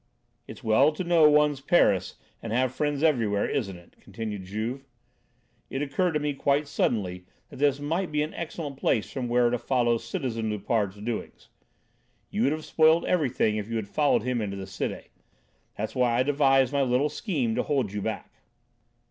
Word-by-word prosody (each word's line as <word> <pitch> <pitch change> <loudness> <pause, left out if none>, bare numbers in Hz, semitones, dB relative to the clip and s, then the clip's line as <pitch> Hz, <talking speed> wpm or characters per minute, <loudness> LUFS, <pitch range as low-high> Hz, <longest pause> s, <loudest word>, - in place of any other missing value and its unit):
"It's - - -11
well 115 +7 +4
to 170 - -4
know 170 -3 +5
one's 150 -2 +3
Paris 135 - +2 0.3
and 115 - -6
have 125 +2 +1
friends 145 +1 -1
everywhere, 115 -10 +2
isn't 100 -9 -2
it?" 85 - -19
continued 105 -4 -6
Juve. 115 +8 -4 0.8
"It 135 - -2
occurred 160 +5 0
to 150 - +1
me 145 -1 -1
quite 140 +2 +1
suddenly 90 -9 -1 0.2
that - - -11
this 145 0 +2
might 165 +5 -2
be 150 0 +1
an 155 - -5
excellent 155 -4 -6
place 110 -5 0
from 130 -2 -3
where 120 0 +3
to 125 - 0
follow 120 -2 +1
citizen 115 - -3
Loupart's 105 -1 -1
doings. 110 +2 -6 0.8
You 105 - -1
would 135 +4 +3
have 155 0 -4
spoiled 160 +1 +4
everything 130 -10 +1
if 105 +1 -4
you 115 - -3
had 110 -3 -2
followed 145 +1 +2
him 125 -1 -1
into 100 -2 -4
the 95 - -6
Cité. 95 - -5 0.7
That's 110 +1 -3
why 125 -2 +2
I 125 - +3
devised 135 -1 +3
my 140 - +2
little 130 +2 +2
scheme 145 - -2
to - - 0
hold 130 -9 -1
you 105 - -3
back." - - -6
130 Hz, 180 wpm, -27 LUFS, 110-145 Hz, 0.8 s, know